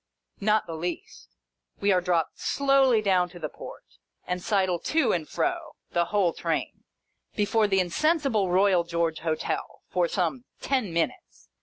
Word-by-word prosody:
Not 215 +1 +2
the 165 - -7
least. 170 +2 -6 0.5
We 200 0 +2
are 185 -1 +3
dropped 170 -3 0
slowly 270 -5 +3
down 185 -3 +2
to 175 - -12
the 155 -2 -4
Port, - - -10 0.4
and 180 0 -3
sidle 185 -3 +1
to 315 - +1
and 160 -4 -2
fro 345 -2 -2 0.2
(the 170 0 +1
whole 190 -3 +1
Train) - - -3 0.5
before 210 +1 +2
the 195 -1 +2
insensible 225 - +1
Royal 185 -1 +4
George 170 -1 -1
Hotel, 160 -1 -3
for 175 -1 +2
some 190 +9 -2
ten 255 -9 -1
minutes. 170 - -3
190 Hz, 150 wpm, -26 LUFS, 170-225 Hz, 0.5 s, Royal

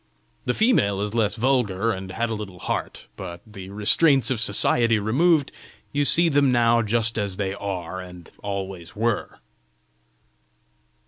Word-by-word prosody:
The - - 0
female 105 - +2
is 105 0 -3
less 110 -3 +1
vulgar, 115 -4 0
and 95 -2 -6
has 115 +4 -2
a - - -1
little 105 -4 -7
heart. - - -4
But, 90 -2 -8
the 95 -3 -11
restraints 130 +8 +3
of 125 - -1
society 115 +2 +4
removed, 140 - +2 0.4
you 145 0 0
see 170 +5 +5
them 140 -3 +3
now 120 -1 +3
just 115 +1 0
as 100 -2 -3
they 95 -1 -2
are 95 -3 -5
and 90 -2 -12
always 95 -3 -6
were!" 115 0 -2
105 Hz, 145 wpm, -23 LUFS, 95-120 Hz, 0.4 s, see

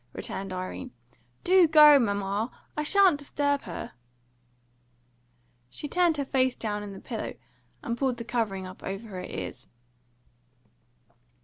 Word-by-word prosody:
returned 195 0 -5
Irene. 185 0 -5 0.5
"Do 365 -1 +6
go, 300 -2 +8
mamma! 200 0 -1 0.3
I 300 - -1
shan't 370 -1 +4
disturb 285 0 0
her." 170 - -6 1.8
She 295 - -6
turned 345 0 +2
her 280 - -1
face 260 -2 +1
down 210 -2 -3
in 205 -1 -7
the 195 - -9
pillow, - - -5 0.5
and 235 - -2
pulled 255 -1 0
the 235 - -5
covering 220 -5 -2
up 185 0 -10
over 195 +4 -6
her 185 -2 -6
ears. 130 -6 -7
235 Hz, 130 wpm, -27 LUFS, 195-295 Hz, 1.8 s, go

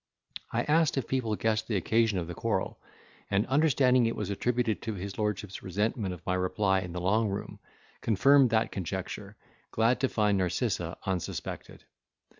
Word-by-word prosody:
I - - 0
asked, 155 -1 +2
if 130 - -1
people 120 -5 0
guessed 110 0 0
the 110 - -1
occasion 110 +2 +2
of 85 - -1
the 85 - -6
quarrel; - - -2 0.5
and, 100 +1 +2
understanding 130 -4 +3
it 115 - -2
was 105 -2 -3
attributed 115 +1 0
to 110 -2 -4
his 95 +1 -6
lordship's 105 -2 -2
resentment 100 +2 -1
of 90 -3 -9
my 90 - 0
reply 95 +1 +1
in 90 -2 -6
the 90 - -3
Long 105 +5 +2
Room, 100 - -5 0.4
confirmed 135 +5 +5
that 110 -1 +1
conjecture, 95 +3 -5 0.3
glad 115 +2 +2
to 130 -1 +1
find 105 -3 +2
Narcissa 90 -1 -1
unsuspected. 95 -3 -4
105 Hz, 165 wpm, -29 LUFS, 95-115 Hz, 0.5 s, confirmed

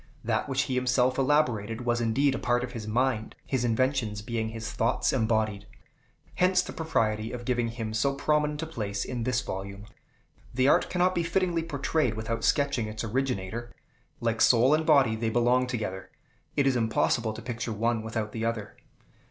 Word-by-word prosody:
That 115 +4 -1
which 135 0 +1
he 130 - -3
himself 125 0 +2
elaborated, 125 -6 +1
was 120 0 +1
indeed 130 +5 +2
a - - -3
part 120 0 +1
of 125 - -5
his 110 -3 -6
mind, 115 0 0
his 130 -3 -1
inventions 115 -3 0
being 110 0 -2
his 110 0 -6
thoughts 115 +3 +1
embodied. 110 -4 0 0.7
Hence 180 0 +3
the - - -7
propriety 110 -9 -1
of 120 -1 -6
giving 120 -2 +1
him 115 -1 -5
so 140 +5 +1
prominent 150 +1 0
a - - -2
place 105 -10 -3
in 120 -3 -4
this 125 -1 +1
volume. 100 -1 -6 0.7
The 130 +1 +3
art - - +4
cannot 180 +1 +2
be 175 - 0
fittingly 170 0 0
portrayed 150 -5 -1
without 115 +1 -3
sketching 140 -6 +1
its 110 +1 -5
originator. 120 -1 -2 0.5
Like 115 -1 -1
soul 125 +4 +5
and 155 0 +1
body, 135 -8 +5
they 110 0 -1
belong 120 +2 +2
together; 105 -6 -4 0.5
it 140 - +3
is 135 -2 +3
impossible 115 0 +1
to 110 - -8
picture 120 -1 -4
one 115 +1 0
without 110 -1 -3
the 110 0 -4
other. 115 -2 -3
120 Hz, 175 wpm, -28 LUFS, 110-135 Hz, 0.7 s, soul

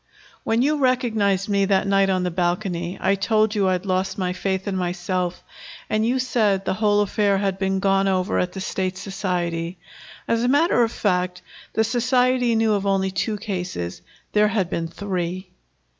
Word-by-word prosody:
"When 225 +2 +1
you 300 +2 +2
recognized 220 -7 +1
me 200 -1 +2
that 195 0 +2
night 195 0 +3
on 185 -1 +1
the 180 - -1
balcony, 175 0 -1
I 190 - +2
told 215 +2 +2
you 200 -3 +1
I'd 185 +1 -1
lost 190 0 -1
my 180 -2 -1
faith 190 +1 -2
in 195 - -1
myself, 180 0 -2 0.5
and 215 0 +2
you 245 +3 +1
said 215 -6 +1
the - - 0
whole 205 0 +2
affair 205 -1 +1
had 195 -1 -1
been 190 0 0
gone 195 0 +2
over 185 -1 +1
at 180 - -1
the 190 - -6
State 185 0 -2
Society. 180 -3 -3 0.5
As 230 0 +1
a - - +2
matter 285 0 +3
of 230 -1 +2
fact, 180 -4 -1 0.3
the 220 - +2
Society 250 +1 +2
knew 220 -1 +2
of 200 -1 -1
only 190 -1 +1
two 210 +3 -1
cases. 180 - -4 0.3
There 210 0 +4
had 205 -5 -1
been 165 -1 -2
three." 185 0 -4
195 Hz, 180 wpm, -23 LUFS, 185-215 Hz, 0.5 s, There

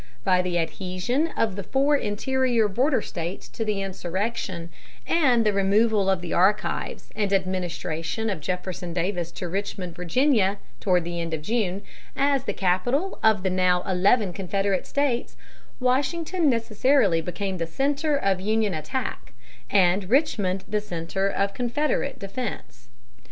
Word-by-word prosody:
By 180 +3 +3
the 180 -1 -1
adhesion 185 - -1
of 220 -4 +1
the 200 - -4
four 275 +7 +2
interior 240 0 +1
border 250 +4 +1
States 170 +2 -5
to 225 - -4
the 210 -2 -1
insurrection, 185 -2 -3 0.3
and 255 -9 +3
the 210 - +3
removal 200 +1 +3
of 190 -2 +1
the 175 -2 -4
archives 200 +4 +1
and 205 -2 0
administration 185 0 -1
of 195 -6 -1
Jefferson 180 +1 -4
Davis 175 -1 -1
to 180 - -5
Richmond, 185 -1 -4
Virginia, 205 - +2 0.2
toward 180 -3 +2
the 170 0 -3
end 165 -1 -2
of 150 - -8
June, 205 -2 -1 0.3
as 275 -1 +2
the - - 0
capital 245 - 0
of 215 -3 +3
the 190 - +1
now 180 -1 +2
eleven 195 +2 +2
Confederate 195 0 -1
States, 280 -4 -1 0.4
Washington 305 +6 +1
necessarily 230 -5 +2
became 185 +2 -4
the 165 - -1
center 285 - 0
of 195 -7 0
Union 215 0 +1
attack, 160 - -4 0.4
and 185 0 +3
Richmond 205 - +1
the 210 +1 0
center 190 0 -2
of 200 0 -1
Confederate 250 +6 -1
defense. 195 - -6
200 Hz, 140 wpm, -25 LUFS, 180-240 Hz, 0.4 s, By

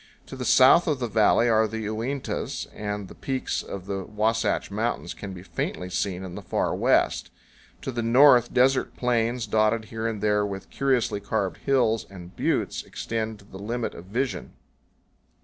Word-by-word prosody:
To - - -9
the 130 -1 -5
south 135 +9 +6
of 150 -3 +1
the 125 -2 -2
valley 110 +2 +4
are 110 -1 +4
the 110 +1 -5
Uintas, 120 +6 -3
and 105 -1 -4
the - - -11
peaks 130 -1 -2
of 95 -2 -7
the 95 -1 -3
Wasatch 110 +3 0
Mountains 105 -4 -2
can 100 - -8
be 90 -1 -9
faintly 90 0 -4
seen 95 0 -2
in 90 -2 -7
the - - -7
far - - -1
west. - - +2 0.5
To 135 - -3
the 120 -1 -2
north, 125 +1 +6
desert 130 +1 +2
plains, 120 -1 0
dotted 110 +1 +1
here 110 0 -2
and 110 -2 -3
there 105 0 +2
with 95 -2 -5
curiously 125 -6 +1
carved 100 -1 -2
hills 120 -5 +1
and 90 -2 -11
buttes, - - 0
extend 110 -1 -4
to 100 - -18
the 95 -1 -11
limit 115 +3 -3
of 85 - -10
vision. 110 -2 -3
110 Hz, 175 wpm, -25 LUFS, 100-120 Hz, 0.5 s, south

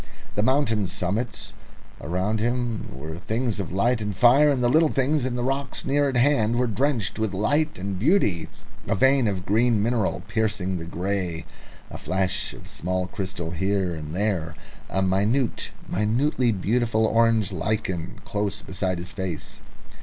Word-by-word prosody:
The 105 - 0
mountain 115 -5 +2
summits 100 +5 -3 0.5
around 95 +6 -1
him 120 0 -1
were 80 +5 -7
things 110 +2 -1
of 95 - -4
light 115 +5 +1
and 105 -2 -3
fire, 125 +8 +6
and 135 -3 +1
the - - +4
little 155 +5 +4
details 135 0 +1
of 130 -2 -2
the 120 - -2
rocks 135 +2 -1
near 140 +1 +2
at 130 - -1
hand 120 -4 +3
were 125 +1 +2
drenched 115 -2 0
with 110 -3 0
subtle 145 - 0 0.2
beauty 105 - +2 0.4
a - - +1
vein 130 +4 +4
of 95 -2 -2
green 115 +2 +3
mineral 110 -6 0
piercing 100 -3 -1
the 85 - -6
grey, 90 -1 -3 0.5
the - - -7
flash 95 +3 -1
of 90 +2 -3
crystal 95 -4 -4
faces 85 - -6
here 95 -2 +1
and 75 0 -6
there, 95 -5 -1 0.3
a 95 - 0
minute, 105 +7 +1 0.2
minutely 120 +5 +1
beautiful 110 +2 +1
orange 115 -2 +3
lichen 95 -2 -2
close 105 -2 -2
beside 95 -1 -2
his 90 +2 -6
face. 95 +3 -5
105 Hz, 155 wpm, -25 LUFS, 95-120 Hz, 0.5 s, fire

